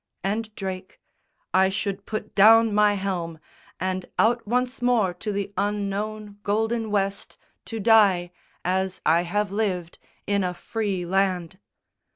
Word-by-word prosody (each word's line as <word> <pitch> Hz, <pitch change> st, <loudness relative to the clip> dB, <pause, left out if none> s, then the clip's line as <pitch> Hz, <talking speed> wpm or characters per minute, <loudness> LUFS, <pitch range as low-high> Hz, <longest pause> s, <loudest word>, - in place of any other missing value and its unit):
And 215 Hz, +3 st, -1 dB
Drake, 190 Hz, -1 st, -6 dB, 0.5 s
"I 190 Hz, 0 st, +5 dB
should 200 Hz, 0 st, -3 dB
put 215 Hz, -1 st, -5 dB
down 225 Hz, +2 st, +6 dB
my 210 Hz, 0 st, +4 dB
helm, 180 Hz, -4 st, -3 dB, 0.4 s
And 185 Hz, 0 st, -2 dB
out 230 Hz, 0 st, +2 dB
once 250 Hz, +2 st, -1 dB
more 235 Hz, -7 st, +2 dB
to 210 Hz, +4 st, -5 dB
the 200 Hz, 0 st, -3 dB
unknown 205 Hz, +1 st, -3 dB
golden 225 Hz, +2 st, 0 dB
West 200 Hz, -1 st, -2 dB, 0.3 s
To 225 Hz, -, -5 dB
die, 200 Hz, -5 st, +4 dB, 0.3 s
as 190 Hz, +1 st, 0 dB
I 165 Hz, +2 st, +4 dB
have 205 Hz, +3 st, -1 dB
lived, 190 Hz, -5 st, -2 dB, 0.3 s
in 200 Hz, -1 st, +1 dB
a 180 Hz, -1 st, -2 dB
free 200 Hz, -3 st, -3 dB
land." 185 Hz, -1 st, 0 dB
200 Hz, 135 wpm, -25 LUFS, 185-215 Hz, 0.5 s, down